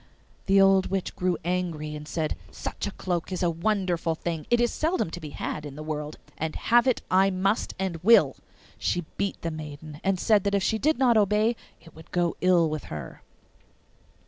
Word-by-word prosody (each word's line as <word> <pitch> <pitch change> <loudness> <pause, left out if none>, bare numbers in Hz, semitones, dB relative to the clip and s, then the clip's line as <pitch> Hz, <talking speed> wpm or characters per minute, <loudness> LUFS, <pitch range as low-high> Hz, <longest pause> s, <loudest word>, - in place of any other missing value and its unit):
The 195 0 +5
old 195 -1 +5
witch 195 -1 -3
grew 180 -2 0
angry, 170 -4 -2
and 150 0 -8
said, 155 -1 -2
'Such - - -5
a - - -3
cloak 175 -2 -3
is 185 0 -2
a 175 - +3
wonderful 175 -2 0
thing, 160 -2 -4
it 240 - +4
is 240 -1 +2
seldom 320 - 0
to 175 - -6
be 155 -3 -7
had 150 +1 -4
in 145 -2 -8
the 155 - -7
world, 150 -1 -4 0.2
and 160 0 -2
have 240 +2 +3
it 255 - +1
I 190 +1 +5
must 195 +3 0
and 190 -3 -2
will.' 230 +4 +6 0.4
She 175 -2 -1
beat 200 -1 -2
the 165 - -1
maiden, 150 -1 -8
and 195 -1 +1
said 210 -2 +3
that 200 0 +2
if 200 - +1
she 220 +2 +1
did 310 +5 +2
not 245 -3 +4
obey 210 +3 +3 0.2
it 165 -1 -17
would 160 0 -14
go 175 -1 0
ill 180 -2 +4
with 155 -1 -4
her. 75 -2 -8
180 Hz, 200 wpm, -26 LUFS, 160-200 Hz, 0.4 s, will